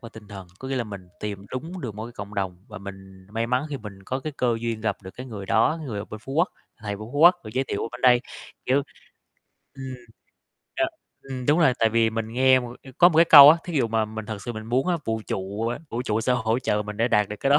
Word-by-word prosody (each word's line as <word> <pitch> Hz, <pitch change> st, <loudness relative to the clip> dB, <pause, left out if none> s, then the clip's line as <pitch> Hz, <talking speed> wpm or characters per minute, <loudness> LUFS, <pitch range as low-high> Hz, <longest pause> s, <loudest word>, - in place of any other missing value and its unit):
và 115 Hz, -, -9 dB
tinh 110 Hz, -2 st, -14 dB
thần, 95 Hz, -3 st, -9 dB
có 130 Hz, -, -7 dB
nghĩa 135 Hz, -, -1 dB
là 120 Hz, -, -1 dB
mình 100 Hz, -4 st, -9 dB
tìm 100 Hz, -1 st, -5 dB
đúng 165 Hz, +8 st, -6 dB
được 110 Hz, -5 st, -5 dB
một 110 Hz, +1 st, -6 dB
cái 120 Hz, -, -9 dB
cộng 100 Hz, 0 st, -8 dB
đồng 95 Hz, -3 st, -2 dB
và 105 Hz, -, -8 dB
mình 95 Hz, -1 st, -11 dB
may 115 Hz, +1 st, -1 dB
mắn 125 Hz, +5 st, 0 dB
khi 140 Hz, -, -4 dB
mình 100 Hz, -4 st, -10 dB
có 130 Hz, +6 st, -3 dB
cái 155 Hz, +2 st, -5 dB
cơ 120 Hz, -2 st, +1 dB
duyên 115 Hz, -2 st, -3 dB
gặp 105 Hz, -3 st, -1 dB
được 95 Hz, -, -9 dB
cái 130 Hz, +1 st, -8 dB
người 100 Hz, -5 st, -7 dB
đó, 115 Hz, +9 st, +2 dB
người 105 Hz, -6 st, -4 dB
ở 100 Hz, -, -4 dB
bên 110 Hz, 0 st, -9 dB
Phú 135 Hz, -, -8 dB
Quốc, 170 Hz, +6 st, +2 dB, 0.3 s
thầy 105 Hz, -1 st, -5 dB
bên -, -, -14 dB
Phú 145 Hz, -, -3 dB
Quốc, 175 Hz, +3 st, +8 dB
được 110 Hz, -, -7 dB
giới 130 Hz, -, +1 dB
thiệu 100 Hz, -, -2 dB
mình -, -, -3 dB
bên 125 Hz, -, -8 dB
đây, 125 Hz, -1 st, +5 dB, 0.5 s
kiểu 135 Hz, +3 st, +3 dB, 0.9 s
ừm, 130 Hz, -1 st, -7 dB, 0.8 s
ờ, 330 Hz, -, +2 dB, 0.4 s
ừm, 130 Hz, -2 st, -6 dB
đúng 150 Hz, +3 st, +4 dB
rồi. 135 Hz, -6 st, +5 dB
Tại 115 Hz, -, +4 dB
vì 115 Hz, 0 st, +2 dB
mình 115 Hz, 0 st, -3 dB
nghe 130 Hz, +1 st, +5 dB
một 120 Hz, 0 st, -8 dB, 0.2 s
có 175 Hz, -, +8 dB
một 160 Hz, -, -2 dB
cái 170 Hz, -, +8 dB
câu 145 Hz, -3 st, +11 dB
á, 165 Hz, -, +5 dB
thí 175 Hz, -, -6 dB
dụ 125 Hz, -, +3 dB
mà 110 Hz, -1 st, +1 dB
mình 110 Hz, 0 st, -7 dB
thật 105 Hz, -3 st, -6 dB
sự 120 Hz, -, -5 dB
mình 110 Hz, -1 st, -7 dB
muốn 125 Hz, +5 st, +1 dB
á, 175 Hz, -, +2 dB
vũ 110 Hz, 0 st, -1 dB
trụ, 100 Hz, +4 st, -3 dB
ơ, 120 Hz, -, -3 dB
vũ 120 Hz, +2 st, -2 dB
trụ 110 Hz, -3 st, -1 dB
sẽ 125 Hz, -, +1 dB
hỗ 115 Hz, -1 st, +1 dB
trợ 105 Hz, -4 st, 0 dB
mình 105 Hz, 0 st, -7 dB
để 115 Hz, +2 st, +1 dB
đạt 105 Hz, -3 st, +2 dB
được 105 Hz, -, -6 dB
cái 135 Hz, -, +1 dB
đó, 145 Hz, -, +7 dB
115 Hz, 285 wpm, -24 LUFS, 105-130 Hz, 0.9 s, câu